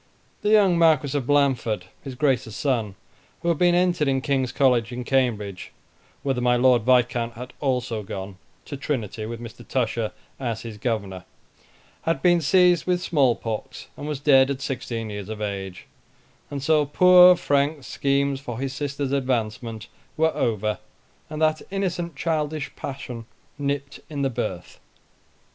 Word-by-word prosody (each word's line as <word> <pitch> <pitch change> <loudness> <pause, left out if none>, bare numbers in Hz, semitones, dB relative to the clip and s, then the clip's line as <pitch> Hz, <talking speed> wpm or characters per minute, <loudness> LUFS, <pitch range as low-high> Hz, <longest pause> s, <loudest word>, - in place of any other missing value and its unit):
The 210 - 0
young 200 -5 +5
Marquis 150 -4 +3
of 135 -4 -1
Blandford, 135 -9 +1 0.2
his 135 -3 -7
Grace's 125 -5 0
son, 115 -8 -1 0.5
who 170 - +1
had 165 - +1
been 175 -1 +4
entered 175 -4 +2
in 135 -1 +2
King's 130 -2 0
College 125 -4 +2
in 125 0 -4
Cambridge, 110 -8 -1 0.5
(whither 135 -3 0
my 125 0 +3
Lord 125 0 +4
Viscount 120 -1 +2
had 125 +2 -8
also 125 -5 -1
gone, 95 -2 -7 0.3
to 145 - -6
Trinity, 115 -6 -3
with 115 0 -6
Mr. 120 0 -10
Tusher 115 -3 -1 0.3
as 115 -4 -3
his 110 -3 -8
governor,) 100 -6 -3 0.8
had 165 -4 -1
been 175 -1 +4
seized 180 +2 +4
with 180 -1 +2
small 140 -9 +2
pox, 110 -2 -6
and 145 - -7
was 150 -3 -3
dead 135 -2 +5
at 140 -1 -2
sixteen 115 -5 -4
years 105 -1 -6
of 110 -1 -5
age, 100 -3 -5 0.6
and 140 -2 -5
so 155 0 +3
poor 180 +4 +7
Frank's 145 -3 0
schemes 140 +1 0
for 120 -4 -6
his 135 +1 -3
sister's 140 -1 -3
advancement 115 -4 -2 0.3
were 160 0 +2
over, 105 -3 -1 0.5
and 155 0 -5
that 155 0 +2
innocent 180 -4 -2
childish 155 -1 -2
passion 125 -4 -7 0.3
nipped 140 0 -3
in 145 -2 -3
the 135 - +1
birth. 95 -6 -5
135 Hz, 155 wpm, -24 LUFS, 115-150 Hz, 0.8 s, poor